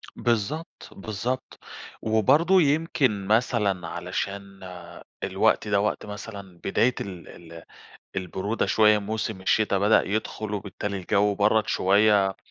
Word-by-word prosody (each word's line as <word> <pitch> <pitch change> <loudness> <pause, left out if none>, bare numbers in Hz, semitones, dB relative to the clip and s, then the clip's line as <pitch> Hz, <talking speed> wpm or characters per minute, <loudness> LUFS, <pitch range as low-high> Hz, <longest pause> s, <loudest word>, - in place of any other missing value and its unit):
بالضبط، 120 +8 -2
بالضبط، 110 +6 -5 0.4
وبرضه 150 - +4
يمكن 140 - +1
مثلًا 105 -6 +1
علشان 100 +1 -5 0.6
الوقت - - +1
ده 100 -1 +2
وقت 105 - -2
مثلًا 100 -3 -9
بداية 120 +5 +2
ال 90 -4 -8
ال 85 -1 -12 0.5
البرودة 95 +4 -2
شويّة، 105 -1 +4
موسم 110 -1 -4
الشتا 100 +1 +2
بدأ 105 +3 +4
يدخُل 110 +1 -3
وبالتالي 100 0 -4
الجو 100 +2 +1
برَّد 105 +2 +2
شويّة، 100 0 +3
105 Hz, 110 wpm, -25 LUFS, 100-110 Hz, 0.6 s, وبرضه